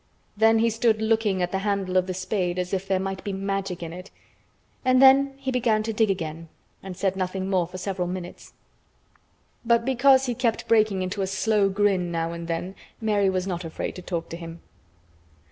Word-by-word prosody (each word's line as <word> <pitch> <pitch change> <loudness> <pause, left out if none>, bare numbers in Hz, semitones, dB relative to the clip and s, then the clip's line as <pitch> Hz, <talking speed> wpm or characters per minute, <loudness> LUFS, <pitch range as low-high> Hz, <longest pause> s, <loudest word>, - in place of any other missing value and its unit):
Then 225 +2 +4
he 230 +1 +2
stood 225 0 +2
looking 220 -4 +1
at 180 - -2
the 190 - -1
handle 195 -2 -1
of 185 0 +3
the 185 - -3
spade 185 -1 -2
as 180 0 -3
if 190 0 -2
there 190 -1 +1
might 190 0 -4
be 200 - -3
Magic 195 -2 -3
in 165 0 -6
it, 180 +3 -9 0.7
and 255 0 +4
then 270 +1 +6
he 270 -1 -3
began 230 -4 +1
to 225 0 -3
dig 215 0 +2
again 165 -3 -4 0.3
and 190 -2 -8
said 195 0 0
nothing 190 +1 -3 0.2
for 180 +2 -9
several 185 -1 -3
minutes. 180 0 -7 1.1
But 235 0 +2
because 265 +1 +4
he 245 - -1
kept 230 -1 -1
breaking 215 -4 +3
into 185 +2 -3
a 190 - 0
slow 200 +1 +1
grin 190 -3 +1
now 165 0 -2
and 170 0 -6
then, 170 +3 -3 0.3
Mary 210 -3 +2
was 185 -1 -1
not 180 -2 -3
afraid 165 -1 -5
to 180 - -8
talk 170 -2 -4
to 165 - -6
him. 165 -1 -9
195 Hz, 195 wpm, -25 LUFS, 180-220 Hz, 1.1 s, then